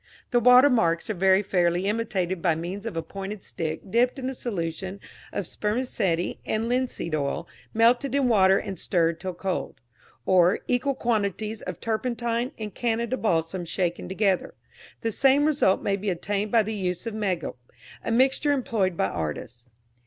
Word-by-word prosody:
The 245 - +4
watermarks 245 -8 +5
are - - -1
very 190 +1 +3
fairly 175 -1 +1
imitated 195 -5 -1
by 165 -2 +2
means 185 +6 -5
of 190 -7 -5
a 165 - -1
pointed 195 +4 -7
stick 160 -1 -4
dipped 245 +4 +2
in 260 0 -3
a - - -5
solution 190 -4 -4 0.3
of 200 - -3
spermaceti 210 -5 -1
and 220 +1 -1
linseed 245 -9 -1
oil 155 +3 -1 0.2
melted 240 +4 +3
in 275 -2 +3
water 195 -4 +5
and 190 -4 -5
stirred 165 -2 +1
till 185 -2 -5
cold; 185 +1 -3 0.5
or, 180 0 +4
equal 255 +3 +1
quantities 215 -2 -1
of - - -6
turpentine 235 +2 -1
and 215 -3 -6
Canada 235 +1 -1
balsam 175 -5 0
shaken 175 +1 -2
together. 195 -1 0 0.5
The 225 - -1
same 275 +5 +4
result 290 -11 +2
may 195 -1 +1
be 200 +1 -2
obtained 200 +3 -2
by 230 -2 +5
the 220 +2 -4
use 180 -1 -2
of 230 - -3
megilp, 190 -10 -2 0.5
a - - -3
mixture 265 +4 +3
employed 210 -9 0
by - - +2
artists. 105 - -5
200 Hz, 160 wpm, -26 LUFS, 180-235 Hz, 0.5 s, watermarks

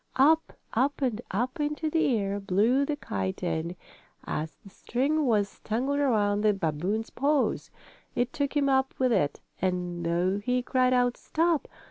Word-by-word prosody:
Up, 310 +5 +4 0.2
up 270 +5 +1
and 240 -3 0
up 245 +8 -2
into 300 +2 -1
the 305 -6 +2
air 200 0 -1
blew 215 +8 +2
the 295 - -1
kite 95 - -4
and, 170 0 -2 0.5
as 155 +1 -4
the 195 - -12
string 280 +8 0
was 205 -4 +1
tangled 265 +6 -1
around 210 -7 +2
the 210 -1 +3
babboon's 190 +6 -2
paws, 285 +2 +1 0.5
it 245 +1 0
took 285 0 -1
him 280 -1 +2
up 265 -1 +2
with 255 -1 +2
it, 145 -8 0 0.2
and 180 -2 -1
though 175 +4 +1
he 250 +4 0
cried 255 0 +2
out: 245 -1 +2
"Stop! 330 -1 0
240 Hz, 160 wpm, -28 LUFS, 195-275 Hz, 0.5 s, Up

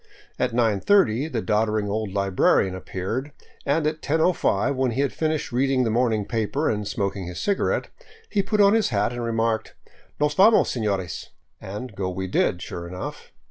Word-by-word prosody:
At 125 - +1
nine 115 -4 +2
thirty 140 - +3
the 120 -8 -3
doddering 105 -1 +1
old 105 0 -2
librarian 95 -1 +2
ap 95 - -10
peared, 115 +10 -3 0.4
and 150 +2 +2
at 155 +1 -1
10 155 - 0
105, 140 - +2
when 130 -1 +1
he 135 - 0
had 140 - 0
finished 155 -3 -1
reading 130 +1 +2
the 115 - 0
morning 110 -3 +1
paper 115 +7 -1
and 105 -2 -3
smoking 100 -3 -2
his 90 - -6
cigarette, 200 -1 0 0.4
he 205 - +1
put 210 +2 -1
on 200 0 +6
his 225 -2 +2
hat 105 +1 0
and 120 -1 -4
remarked, 115 -1 -1 0.2
" - - -32
Nos 150 0 +2
vamos, 210 +7 +5
sefiores," 100 -7 -2 0.3
and 105 +4 -7
go 95 -1 -2
we 95 +1 -4
did, 90 -1 0
sure 85 0 -6
enough. 90 +1 -7
115 Hz, 185 wpm, -24 LUFS, 100-140 Hz, 0.4 s, on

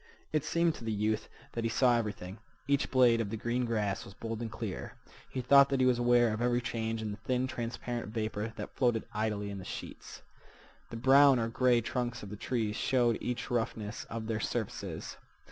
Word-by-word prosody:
It 155 -2 +2
seemed 170 +1 +2
to 120 - -10
the 115 - -2
youth 105 +1 -1 0.2
that 115 - -3
he 115 - +1
saw 120 +2 +4
everything. 100 -3 -3 0.3
Each 140 -1 +2
blade 120 -3 +5
of 105 - -3
the 110 - -3
green 120 +3 -1
grass 105 -4 -1
was 100 - -12
bold 115 0 -5
and 115 -2 -4
clear. - - -5 0.4
He 130 - -3
thought 140 +2 +7
that 135 -1 +1
he 130 - +4
was 125 -1 +3
aware 120 -2 +4
of 110 - -3
every 120 0 +2
change 115 -2 -3
in 105 - -3
the 105 - -6
thin, 130 +2 0
transparent 120 -1 -4
vapor 110 -1 -2
that 105 - -7
floated 120 -4 +1
idly 105 -1 -1
in 100 -1 -6
sheets. - - -8 0.7
The 115 - -6
brown 135 +2 +6
or 115 -1 0
gray 125 0 +3
trunks 120 0 -3
of 100 - -8
the - - -5
trees 110 -1 -2
showed 120 -3 +2
each 125 0 -3
roughness 115 -2 -2
of 115 -1 -5
their 110 -1 -1
surfaces. - - -4
115 Hz, 200 wpm, -31 LUFS, 110-125 Hz, 0.7 s, thought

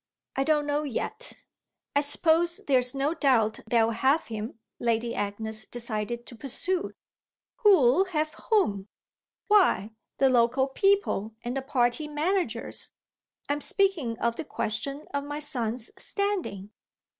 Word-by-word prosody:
I 270 - +1
don't 300 0 +2
know 290 0 0
yet." 300 - -4 0.5
"I 285 - +5
suppose 330 +3 +3
there's 255 -2 +3
no 275 +3 0
doubt 255 -9 +2
they'll 230 -1 +3
have 265 +7 +2
him," 220 0 -6 0.2
Lady 235 0 0
Agnes 215 +2 -3
decided 235 0 -3
to 240 - -10
pursue. 345 - -2 0.6
"Who'll 375 - +5
have 310 -4 -2 0.2
whom?" 210 - +2 0.6
"Why, 375 - +4 0.3
the 270 - +4
local 250 +1 +3
people 270 - +1
and 240 +2 -3
the 270 - -1
party 260 +2 0
managers. 300 - -2 0.6
I'm 290 +1 -1
speaking 330 - +1
of 235 0 -1
the - - -3
question 275 +3 -3
of 280 0 -1
my 290 +1 -5
son's 245 -6 -1
standing." 365 - -2
270 Hz, 130 wpm, -27 LUFS, 230-315 Hz, 0.6 s, I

